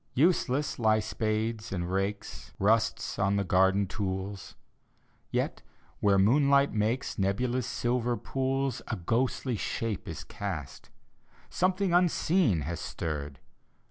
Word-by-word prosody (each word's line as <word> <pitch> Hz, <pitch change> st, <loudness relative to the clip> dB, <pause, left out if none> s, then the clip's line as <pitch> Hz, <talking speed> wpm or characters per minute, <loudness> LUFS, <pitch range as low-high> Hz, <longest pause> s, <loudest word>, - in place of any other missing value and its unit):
Useless 145 Hz, -3 st, +2 dB
lie 110 Hz, -2 st, +4 dB
spades 110 Hz, +1 st, -2 dB
and 90 Hz, -2 st, -2 dB
rakes; 95 Hz, +2 st, -3 dB
Rust's 110 Hz, +3 st, +1 dB
on 100 Hz, +1 st, +2 dB
the 100 Hz, -, +1 dB
garden 95 Hz, +2 st, +3 dB
tools. 95 Hz, 0 st, -4 dB, 0.7 s
Yet, -, -, -1 dB, 0.4 s
where 100 Hz, -1 st, +4 dB
the 95 Hz, -, +5 dB
moonlight 140 Hz, +4 st, +4 dB
makes 110 Hz, +4 st, -1 dB
Nebulous 120 Hz, +6 st, 0 dB
silver 120 Hz, 0 st, 0 dB
pools 135 Hz, +3 st, -1 dB
A -, -, -2 dB
ghostly 120 Hz, +6 st, 0 dB
shape 110 Hz, 0 st, -3 dB
is -, -, -6 dB
cast 80 Hz, -9 st, -6 dB, 0.3 s
— -, -, -38 dB, 0.3 s
Something 185 Hz, 0 st, +1 dB
unseen 175 Hz, -, +3 dB
has 80 Hz, +4 st, -4 dB
stirred 75 Hz, -3 st, -4 dB
110 Hz, 120 wpm, -29 LUFS, 95-130 Hz, 0.7 s, the